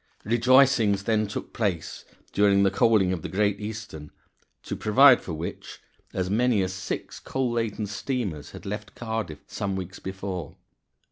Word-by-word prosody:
Rejoicings 120 -3 +4
then 110 -1 +1
took 105 - -6
place 95 -8 -2 0.3
during 100 0 +4
the 95 - +3
coaling 105 -5 +3
of 85 - -4
the - - -5
Great 100 0 +1
Eastern 105 -8 -7 0.5
to - - -4
provide 130 +4 +6
for 85 - -6
which 80 +2 -7 0.3
as 95 -1 -2
many 110 0 +2
as 95 0 -3
six 95 0 -5
coal 130 -2 -2
laden 115 -2 -1
steamers 100 - -3
had - - -11
left 105 +1 -6
Cardiff 110 -10 -4
some 100 -1 -3
weeks 95 0 -6
before. 95 -3 -5
105 Hz, 150 wpm, -26 LUFS, 95-115 Hz, 0.5 s, provide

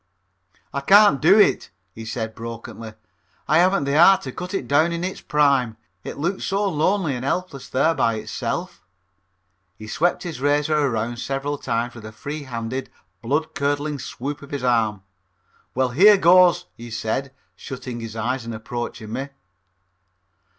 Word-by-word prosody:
"I 140 - -2
can't 200 -2 +6
do 180 +7 +6
it," 205 - +3 0.2
he 115 +3 -9
said 110 0 -4
brokenly, 115 -1 -8 0.5
"I 155 +3 +4
haven't 185 -1 +3
the 140 +1 -1
heart 190 +3 +7
to 130 - -5
cut 180 +7 -6
it 135 - -3
down 155 +6 +3
in 170 +1 -3
its 185 +1 -4
prime. 140 -6 +2 0.3
It - - -7
looks 175 +7 -2
so 200 +1 0
lonely 165 0 +1
and 125 - -5
helpless 140 -1 -3
there 155 +5 +2
by 115 -7 +1
itself." 115 - -4 1.0
He 110 - -10
swept 165 +11 0
his 160 -7 -6
razor 145 +2 +2
around 120 -5 0
several 135 +3 -3
times 120 0 -2
with 120 -2 -11
a 110 - -8
free 145 +6 -7
handed, 125 +1 -4 0.3
blood 150 +6 -1
curdling 145 +1 -1
swoop 140 +4 -6
of 140 - -12
his 140 -3 -4
arm. 110 -5 +1 0.7
"Well, 130 0 +1
here 200 - +6
goes," 180 -1 +5
he 120 +1 -10
said, 120 +4 -3 0.2
shutting 125 +3 -7
his 115 -1 -7
eyes 120 +3 -2
and 115 -1 -6
approaching 110 -1 -6
me. 135 +2 -4
140 Hz, 160 wpm, -22 LUFS, 115-160 Hz, 1.0 s, heart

